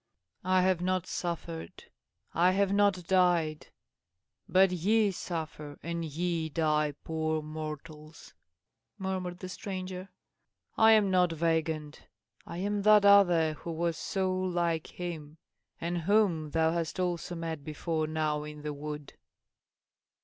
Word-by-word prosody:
"I 185 0 +3
have 185 -2 +2
not 185 0 0
suffered, 170 -2 -5 0.5
I 180 +3 +4
have 200 0 +2
not 200 -3 +2
died; 175 -4 +2 0.8
but 190 0 +5
ye 205 +4 +2
suffer, 155 -5 -6
and 170 0 -3
ye 165 +1 -2
die, 150 -2 +1
poor 160 -1 -1
mortals!" 155 0 -8 0.6
murmured 185 -2 -3
the 185 - -7
stranger. 185 0 -6 0.7
"I 220 0 +7
am 210 -3 +4
not 180 -2 +3
Weigand. 160 -2 -1 0.5
I 170 - -6
am 205 +2 -1
that 210 0 +6
other, 175 -6 +6
who 170 +2 -7
was 165 0 -1
so 190 +3 -1
like 175 -3 -1
him, 160 -4 -7 0.4
and 175 +1 -2
whom 175 -4 +2
thou 160 +1 +2
hast 165 0 -2
also 175 -1 -2
met 165 -3 -4
before 155 +1 -2
now 155 -1 -1
in 150 0 -9
the 150 -1 -3
wood." 150 0 -7
170 Hz, 130 wpm, -30 LUFS, 155-185 Hz, 0.8 s, I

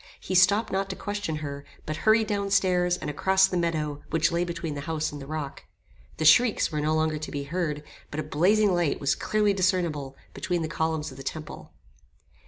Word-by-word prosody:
He - - -5
stopped 200 +5 +4
not 195 0 -1
to 190 - -4
question 205 -6 -3
her, 140 0 -6 0.2
but 155 - -3
hurried 220 0 +5
down 200 -2 -2
stairs 180 -2 +2
and - - -6
across 190 +6 +3
the 190 - -3
meadow 155 -4 -1
which 165 +1 +2
lay 170 +1 +1
between 170 -2 -4
the 140 - -5
house 155 -1 -1
and 145 -1 -8
the 135 - -9
rock. 150 -2 -5 0.5
The 155 - -1
shrieks 220 +8 +5
were 150 -1 -1
no 155 +1 +1
longer 155 -1 0
to 155 - -6
be 140 -1 -3
heard; 150 -1 -3 0.3
but 145 - -5
a - - -1
blazing 200 +6 +3
light 175 -4 +1
was 140 0 +2
clearly 210 -1 +1
discernible 170 -8 0 0.2
between 175 -2 -2
the - - -2
columns 160 -1 -2
of 130 - -12
the 135 - -8
temple. 155 +1 -7
165 Hz, 205 wpm, -26 LUFS, 150-190 Hz, 0.5 s, hurried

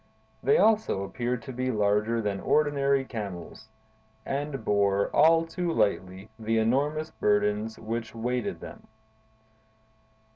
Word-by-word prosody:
They 140 - +4
also 215 - +2
appeared 120 +5 -3
to 130 - -7
be 130 +1 -2
larger 105 +1 +1
than 100 -2 -2
ordinary 140 0 +2
camels, 105 -3 -7 0.6
and 140 -3 -3
bore—all 105 +12 +3
too 170 +1 -3
lightly—the 110 - -1
enormous 145 +8 0
burdens 105 +1 0
which 115 0 -5
weighted 120 +1 -2
them. - - -11
115 Hz, 105 wpm, -27 LUFS, 105-140 Hz, 0.6 s, They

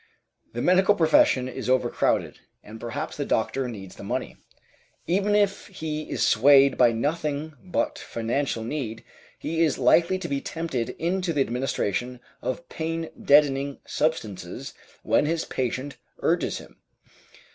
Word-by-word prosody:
The 120 - -3
medical 190 +3 +4
profession 155 -7 +4
is 130 - -5
overcrowded, 130 -2 +1 0.2
and 110 +2 -10
perhaps 130 +7 -4
the 145 - -2
doctor 130 +1 0
needs 100 -6 -9
the - - -9
money. - - -3 0.7
Even 200 +4 +1
if 205 -1 +1
he 155 -5 -5
is - - 0
swayed 140 -1 +6
by 120 -2 +5
nothing 150 +4 -2
but - - -1
financial 115 +1 -2
need, 115 -3 -4 0.3
he 165 +1 -2
is 155 -5 +1
likely 170 +8 +4
to 185 -2 -5
be 140 -3 -2
tempted 160 -8 -3
into 180 +1 -1
the 145 - +1
administration 125 -1 -1 0.2
of 170 +7 -4
pain 165 0 -4
deadening 140 -1 +4
substances 115 - -3 0.3
when 150 - +2
his 165 +1 -1
patient 130 +2 -3 0.3
urges - - +1
him. - - -13
140 Hz, 135 wpm, -25 LUFS, 125-165 Hz, 0.7 s, swayed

